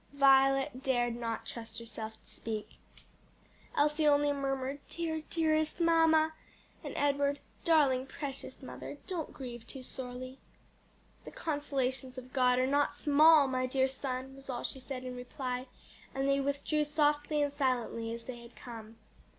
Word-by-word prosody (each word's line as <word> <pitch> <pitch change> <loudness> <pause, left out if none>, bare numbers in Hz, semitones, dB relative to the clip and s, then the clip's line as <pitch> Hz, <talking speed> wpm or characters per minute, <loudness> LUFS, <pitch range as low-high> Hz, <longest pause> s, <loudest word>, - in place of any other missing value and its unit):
Violet 270 -1 +4
dared 240 -3 +1
not 230 -1 -3
trust 225 -1 -6
herself 220 -1 -6
to - - -28
speak. 215 -2 -6 1.0
Elsie 300 +1 +3
only 290 0 +4
murmured, 270 0 -2
"Dear, 320 -2 -2
dearest 315 0 +1
mamma!" 325 -1 +4 0.5
and - - -6
Edward, 285 0 +2 0.3
"Darling, 275 -6 +4
precious 275 -1 -6
mother, 285 - -7
don't 350 -5 -3
grieve 240 -4 -8
too 265 -2 -6
sorely." 255 +1 -6 0.8
"The - - -8
consolations 270 -4 -2
of 255 0 -9
God 250 -2 +4
are 255 - +3
not 285 +2 +2
small! 300 0 +6
my 255 -1 0
dear 265 +1 +2
son," 265 0 -4
was 275 0 -13
all 245 -2 -3
she 265 - -3
said 255 0 -6
in 255 -1 -5
reply, 250 +1 -4 0.5
and 270 0 0
they 275 0 +3
withdrew 280 +2 0
softly 295 0 +2
and 285 - 0
silently 245 -5 0
as 230 0 -5
they 240 0 -7
had 235 0 -14
come. 225 -2 -10
270 Hz, 150 wpm, -32 LUFS, 250-290 Hz, 1.0 s, small